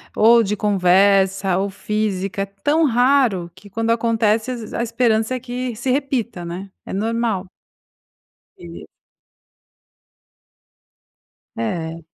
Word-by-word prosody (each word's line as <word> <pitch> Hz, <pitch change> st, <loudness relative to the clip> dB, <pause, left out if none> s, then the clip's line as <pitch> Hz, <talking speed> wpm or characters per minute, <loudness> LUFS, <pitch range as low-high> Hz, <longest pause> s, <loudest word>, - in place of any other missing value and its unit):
ou 230 Hz, +2 st, +6 dB
de 210 Hz, 0 st, -2 dB
conversa 195 Hz, -1 st, +3 dB
ou 200 Hz, +1 st, -1 dB
física. 200 Hz, -1 st, -2 dB
É 195 Hz, -, 0 dB
tão 290 Hz, +12 st, 0 dB
raro, 245 Hz, -8 st, +2 dB
que 200 Hz, +2 st, -15 dB
quando 225 Hz, +3 st, -1 dB
acontece 225 Hz, 0 st, +1 dB
as 235 Hz, -3 st, -7 dB
a 235 Hz, -, -1 dB
esperança 230 Hz, 0 st, +1 dB
é -, -, -3 dB
que 250 Hz, 0 st, -4 dB
se 240 Hz, +4 st, -4 dB
repita, 250 Hz, -8 st, -1 dB
né. 175 Hz, +3 st, -6 dB, 0.2 s
É -, -, -8 dB
normal. 220 Hz, -2 st, -1 dB, 1.1 s
E 85 Hz, -2 st, -11 dB, 2.7 s
É. 160 Hz, +8 st, -3 dB
215 Hz, 115 wpm, -20 LUFS, 190-235 Hz, 2.7 s, ou